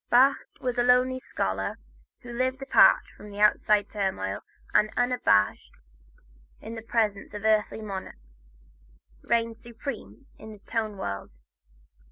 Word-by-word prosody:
Bach 265 +3 +4
was 250 -1 -2
the 240 - +3
lonely 250 +1 +3
scholar 95 - -3 0.4
who 240 -1 -9
lived 255 +2 -1
apart 270 - +6
from 210 - -12
outside 210 0 +3
turmoil 190 - -2 0.3
and 210 - +4
unabashed 245 - +2 0.8
in 225 - -8
the 225 - -6
presence 215 -3 -1
of 210 +1 -6
earthly 215 0 +1
monarchs, 195 -3 -6 1.0
reigned 230 -1 0
supreme 230 - -8
in 220 - -10
the - - -12
tone 220 -3 -2
world. 100 - -6
220 Hz, 125 wpm, -27 LUFS, 200-245 Hz, 1.0 s, apart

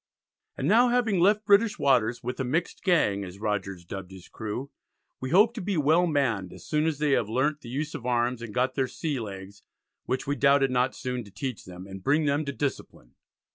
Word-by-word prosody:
And 135 - -1
now 230 +6 +5
having 240 -6 +2
left 205 +4 +3
British 210 +2 +4
waters, 120 -3 +2
with 125 +2 -4
a - - 0
"mixed 155 +8 -2
gang," 135 - +2
as 90 0 -9
Rogers 100 -4 -3
dubbed 95 +1 -7
his 95 -2 -12
crew, 110 +6 -5 0.5
"we 130 - -4
hope 210 - +5
to 235 - -5
be 195 -1 -1
well 160 +4 +3
manned, 120 - 0
as - - -13
soon 150 +1 +1
as 160 -3 -1
they 150 -1 +1
have 115 -6 +2
learnt 145 +6 0
the 120 - -10
use 150 +5 -3
of 145 -6 -6
arms, 120 0 0
and 120 -2 -7
got 125 +3 0
their 135 -1 0
sea 145 +1 -3
legs, 100 -2 -8 0.5
which 130 - -1
we 145 0 -1
doubted 140 -1 +4
not 125 +1 +1
soon 125 -2 -4
to - - -13
teach 130 0 -5
them, 90 0 -10
and 95 0 -9
bring 150 - +2
them 145 +1 +1
to 140 - -2
discipline." 135 - -5
130 Hz, 215 wpm, -27 LUFS, 110-155 Hz, 0.5 s, now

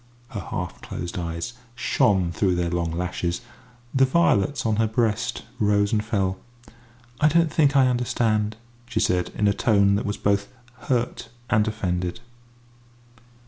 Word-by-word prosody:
Her - - -5
half - - -5
closed 85 +2 -5
eyes 85 +7 -4 0.2
shone 95 -5 +2
through 90 +1 +1
their 85 -1 -1
long 85 -1 -1
lashes; 85 0 -2 0.5
the 135 - +4
violets 135 - +2
on 110 -2 +1
her 110 0 +3
breast 115 +1 0 0.2
rose 100 -1 +2
and 105 -1 +2
fell. 95 -4 -1 0.8
"I 150 - +5
don't 165 +1 +3
think 145 -4 +3
I 135 -1 +6
understand," 110 -3 0 0.3
she 115 -2 -1
said, 90 -3 +1
in 105 - +2
a 100 - +4
tone 100 -2 +3
that - - -3
was 100 - -2
both 100 0 +1 0.4
hurt 125 -2 -1 0.2
and 110 -2 +3
offended. 90 -4 -2
105 Hz, 145 wpm, -24 LUFS, 90-120 Hz, 0.8 s, I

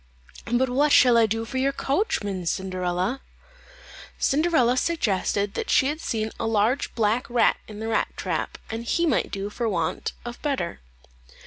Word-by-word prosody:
"But 250 +2 +3
what 285 +4 +3
shall 250 -4 +6
I 230 -1 +5
do 225 +1 -2
for 260 +3 -3
your 275 +1 +2
coachman, 205 - -1
Cinderella?" 185 +6 -1 1.0
Cinderella 280 -5 +2
suggested 205 - 0
that - - -4
she 265 - +4
had 305 +2 -4
seen 220 -1 -2
a 225 - -1
large 225 +5 +1
black 225 +2 +1
rat 235 -2 +3
in 210 - -9
the 220 - -4
rat 225 -1 +1
trap, - - -3
and 225 +1 -4
he 335 +8 +1
might 295 -8 +1
do 200 +1 -4
for 235 +1 -2
want 170 -5 -2
of 240 0 -7
better. 275 - -2
230 Hz, 160 wpm, -25 LUFS, 205-265 Hz, 1.0 s, shall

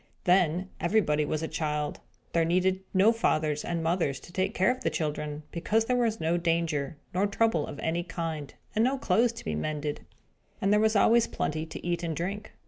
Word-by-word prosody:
Then, 180 0 +3
everybody 165 -5 +2
was 155 +1 -2
a - - -1
child. 150 -2 -2 0.3
There 170 - +3
needed 185 +3 +2
no 195 +4 +5
fathers 155 -10 +1
and 170 -1 -2
mothers 165 -5 0
to 175 - -14
take 190 +4 -1
care 240 - +4
of 255 - -5
the - - +1
children; 150 -1 -3
because 215 +6 +1
there 250 - +1
was 230 -3 +1
no 165 +2 +1
danger, 165 -4 0 0.2
nor 190 +3 +2
trouble 205 -6 +1
of - - -7
any 165 +3 -1
kind, 165 -4 -4 0.2
and 220 - +3
no 265 +3 +2
clothes 235 -2 +2
to - - -10
be 80 - -2
mended, 150 - -3 0.6
and 195 +1 +2
there 210 - +5
was 220 0 +3
always 230 +3 +5
plenty 155 +1 -2
to 160 - -8
eat 175 -1 0
and 165 -2 -2
drink. 200 +6 -4
170 Hz, 200 wpm, -28 LUFS, 155-205 Hz, 0.6 s, no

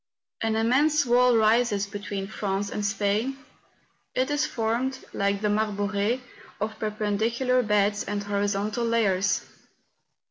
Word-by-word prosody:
An 225 -1 0
immense 280 +7 +3
wall 245 0 +4
rises 220 -2 +3
between 200 -1 -5
France 200 0 -3
and 210 - -3
Spain; 210 +5 0 0.8
it 260 +3 +1
is 295 +1 +1
formed, 240 +3 -1 0.2
like 200 0 0
the 210 - +1
Marbore, 205 +2 0 0.4
of 215 +1 -3
perpendicular 220 +4 0
beds 205 -2 +1
and 205 0 -3
horizontal 205 +2 -1
layers. 205 -4 +1
215 Hz, 115 wpm, -26 LUFS, 205-240 Hz, 0.8 s, wall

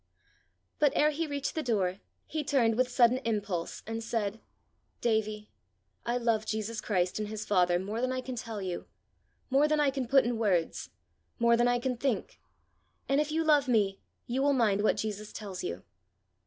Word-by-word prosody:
But 290 -2 +4
ere 300 +1 +4
he 320 +2 -2
reached 280 -1 -3
the 315 - -1
door, 200 -7 0 0.3
he 310 -1 -3
turned 250 -6 +3
with 255 +1 +2
sudden 245 0 +4
impulse, 205 -8 -3
and 225 +1 -4
said: 225 -2 -2 0.6
"Davie, 215 -2 -1 0.6
I 240 +1 +1
love 230 -3 +1
Jesus 220 +1 -3
Christ 185 -2 0
and 215 - -2
his 215 0 -5
Father 180 -3 +3
more 205 +5 -3
than 255 0 0
I 255 - -1
can 255 0 -6
tell 225 -4 -5
you 180 -2 -4 0.6
more 280 +3 +5
than 305 0 +1
I 290 -2 +3
can 265 -2 -3
put 270 0 +5
in 240 -1 -1
words 185 -7 0 0.5
more 235 -1 +4
than 240 +1 +3
I 245 0 +3
can 250 0 -2
think; 275 - -2 0.7
and 275 +2 +3
if 300 0 -2
you 325 +1 +1
love 295 -3 +4
me 205 -5 +2 0.3
you 255 +3 -1
will 285 +1 +3
mind 215 -6 +2
what 215 - +2
Jesus 215 -1 -4
tells 195 -4 -6
you." 85 +2 -4
230 Hz, 185 wpm, -30 LUFS, 210-265 Hz, 0.7 s, more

